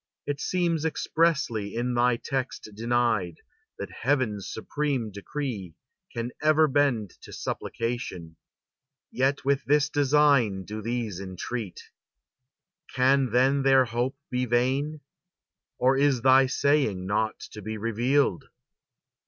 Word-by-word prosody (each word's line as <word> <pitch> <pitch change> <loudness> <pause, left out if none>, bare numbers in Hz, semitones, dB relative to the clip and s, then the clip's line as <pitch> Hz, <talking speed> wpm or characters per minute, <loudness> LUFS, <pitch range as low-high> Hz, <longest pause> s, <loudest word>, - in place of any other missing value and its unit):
It 145 0 -3
seems 170 -4 0
expressly 150 -10 0
in 120 +1 -1
thy 120 0 +3
text 130 -1 -4
denied, 115 -5 0 0.4
That - - -6
Heaven's 120 -7 -1
supreme 135 -2 -2
decree 100 - -5 0.4
can 115 +1 -4
ever 155 +1 +4
bend 130 -8 +1
To - - -12
supplication; 115 -9 -4 0.8
yet 135 +2 0
with 140 0 +1
this 150 +1 +3
design 140 -9 +3
Do 105 +3 -6
these 115 -4 -3
entreat. 100 +2 -6 1.1
Can 135 0 +3
then 130 +4 +3
their 135 -1 +5
hope 120 +3 -2
be 125 0 0
vain? 135 +5 0 0.8
Or 130 +1 +3
is 135 -4 +2
thy 130 0 +6
saying 135 -9 +1
not 110 +3 -1
to 105 - -9
be 110 +2 -5
revealed?" 115 +1 +1
125 Hz, 115 wpm, -26 LUFS, 110-140 Hz, 1.1 s, thy